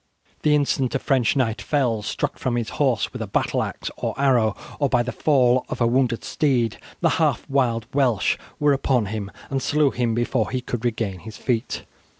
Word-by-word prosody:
The 150 -1 +4
instant 135 -3 +1
a - - +4
French 130 -3 +1
knight 115 -4 0
fell, 125 -7 0
struck - - -3
from 125 -2 -1
his 120 -2 -1
horse 125 -7 +1
with - - -6
a - - -3
battle - - 0
axe - - -4
or - - -3
arrow, 120 -7 +3 0.2
or 140 -2 +2
by 120 - +3
the 125 - -3
fall 130 -4 +3
of - - -4
a 120 - +3
wounded 120 -1 +1
steed, 125 -7 0 0.2
the - - +4
half - - +1
wild 120 -5 +1
Welsh 130 -7 +2 0.2
were 145 -1 +4
upon 130 -4 +1
him, 105 -3 -4 0.2
and 135 -1 0
slew 150 0 +2
him 120 -2 0
before 120 -1 0
he 130 - -1
could 120 -2 -4
regain 110 -6 -1
his 110 +4 -10
feet. 120 -2 -2
125 Hz, 195 wpm, -23 LUFS, 115-135 Hz, 0.2 s, The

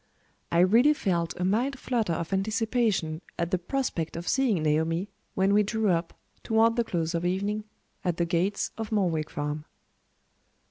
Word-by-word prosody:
I 170 - +4
really 235 +11 +5
felt 170 - -1
a 180 - 0
mild 245 +8 +1
flutter 230 -8 -1
of 165 +3 -3
anticipation 215 -5 0 0.2
at 170 +1 -1
the 185 - +1
prospect 180 - -2
of 170 - -6
seeing 235 - +2
Naomi, 160 +5 +1 0.3
when 190 +1 +3
we 210 - +5
drew 215 0 0
up, 170 -1 0 0.3
toward 225 +1 +3
the 240 - +2
close 165 -5 -2
of 170 0 -1
evening, 200 +4 -1 0.4
at 175 -2 0
the 170 - +1
gates 180 +4 0
of 220 -1 -4
Morwick 170 -7 0
Farm. 150 +1 -3
190 Hz, 165 wpm, -27 LUFS, 170-220 Hz, 0.4 s, really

